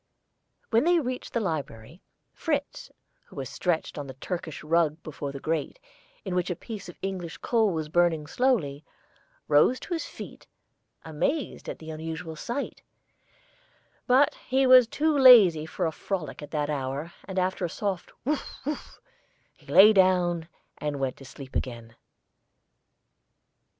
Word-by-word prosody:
When 230 +2 +4
they 345 +1 +4
reached 255 -4 -4
the 235 - +1
library, 155 - -5 0.3
Fritz, 290 -3 -3 0.4
who - - -17
was - - -5
stretched 170 -4 -1
on 145 - -6
the 130 - -9
Turkish 160 +2 -5
rug 160 -1 +2
before 145 -2 -5
the 140 - -7
grate, 160 - -2 0.5
in 190 - -3
which 180 0 0
a 180 - -1
piece 210 +1 -8
of 175 - -12
English 185 -4 -4
coal 225 -4 +2
was 160 -3 -3
burning 165 -1 +2
slowly, 160 - 0 0.6
rose 155 +13 +4
to 360 - -5
his 330 - -3
feet, - - -10 0.6
amazed 170 - -2
at - - -5
the 160 0 -9
unusual 160 +1 -6
sight; 240 - -5 1.3
but 265 +3 +5
he 265 +1 +3
was 255 -2 +8
too 305 +5 +1
lazy 210 - +7
for 175 +3 -2
a 160 - 0
frolic 180 -1 -4
at 145 - -8
that 150 -1 -1
hour, 140 +3 -3
and 190 -1 -7
after 185 0 0
a 175 - 0
soft 195 0 -3
"wuf 295 +2 -2
wuf" 295 +1 -5 0.6
he - - -25
lay 210 +3 +8
down 180 -4 +3 0.3
and 150 -2 -3
went 135 -2 -1
to 135 - -13
sleep 135 0 -11
again. 115 -2 -4
175 Hz, 150 wpm, -27 LUFS, 150-230 Hz, 1.3 s, was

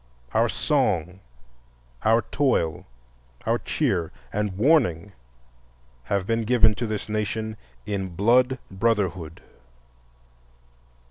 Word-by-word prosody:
Our 115 +1 +3
song, 95 - 0 0.8
our 115 +2 +4
toil, 120 - 0 0.6
our - - +1
cheer, 85 -2 -1 0.2
and 105 -2 -2
warning 105 - +3 0.9
have 100 +2 -1
been 115 +2 0
given 110 -1 +4
to 115 +3 -3
this 110 -2 -4
nation 110 +1 -2 0.3
in 95 -4 -3
blood 125 +6 +3
brotherhood. 95 -5 -1
105 Hz, 90 wpm, -25 LUFS, 95-115 Hz, 0.9 s, our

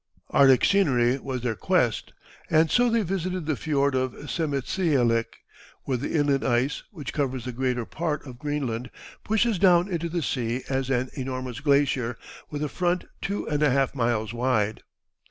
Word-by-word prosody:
Arctic 135 -3 +6
scenery 135 -10 +3
was 130 -2 -4
their 120 -2 0
quest, - - 0 0.4
and 160 0 +3
so 245 0 +4
they 230 -1 +2
visited 185 -2 -2
the 155 -1 0
fiord 140 -1 0
of 130 -1 0 0.2
Sermitsialik, 140 -6 0 0.4
where 130 -2 -1
the 130 - -4
inland 145 -3 +2
ice, 130 +3 +1
which 155 -10 -7
covers 130 -4 -2
the 125 - -3
greater 125 -1 -1
part 155 0 -3
of 125 -3 -10
Greenland, 130 -5 -3 0.3
pushes 220 -2 +1
down 180 -1 +5
into 170 -3 -2
the 170 0 -2
sea 120 -1 -2
as 135 -1 -1
an 130 -1 0
enormous 130 -2 -4
glacier, 140 -5 +1 0.3
with 150 0 -4
a - - 0
front 175 +4 -1 0.2
two 200 +1 -3
and 150 -1 -1
a 150 - +4
half 135 0 +1
miles 115 -4 0
wide. 115 -3 0
140 Hz, 165 wpm, -26 LUFS, 125-160 Hz, 0.4 s, Arctic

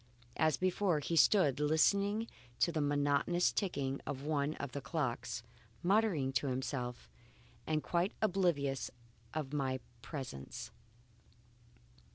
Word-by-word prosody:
As 155 -1 +3
before, 185 -2 +2
he 165 +3 -2
stood 155 -5 +5
listening 200 +8 +3 0.3
to 170 - +3
the 155 -2 0
monotonous 145 +4 +2
ticking 140 -9 -1
of 135 -1 -4
one 150 0 0
of 140 -2 -5
the 140 - -4
clocks, 145 -8 -2 0.4
muttering 180 -9 +2
to 135 +3 +1
himself 125 -1 -3 0.6
and 155 -1 +1
quite 175 +3 0
oblivious 175 -10 +1 0.5
of 150 -3 -3
my 135 -3 0 0.2
presence. 130 - -6
150 Hz, 115 wpm, -35 LUFS, 135-175 Hz, 0.6 s, stood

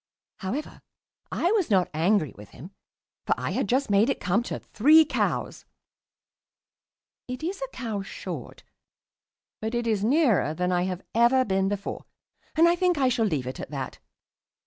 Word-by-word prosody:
However, 235 +11 -5 0.5
I 350 - +1
was 410 - +1
not 190 -4 +3
angry 165 -1 +1
with 105 0 -13
him, 175 +8 -12 0.6
for - - +3
I - - -3
had - - -1
just 260 -2 +1
made 205 +5 +4
it 275 - -1
come 190 +6 +1
to - - -3
"three 310 +8 +5
cows." - - -2 1.6
It 250 +3 -6
is 380 +7 -3
a - - -2
cow 220 -5 -4
short, 195 - -8 1.0
but 220 +2 -3
it 240 0 -1
is 215 -3 0
nearer 230 - +2
than 180 +2 0
I 180 0 +1
have 185 -1 -4
ever 240 +3 +4
been 195 -1 +1
before, 200 -1 -4 0.5
and 330 +2 +6
I 340 - +4
think 355 -2 +1
I 265 -2 +3
shall 230 -3 +1
leave 150 -9 -1
it 130 - -6
at - - -6
that. 135 -3 -5
220 Hz, 170 wpm, -26 LUFS, 185-275 Hz, 1.6 s, and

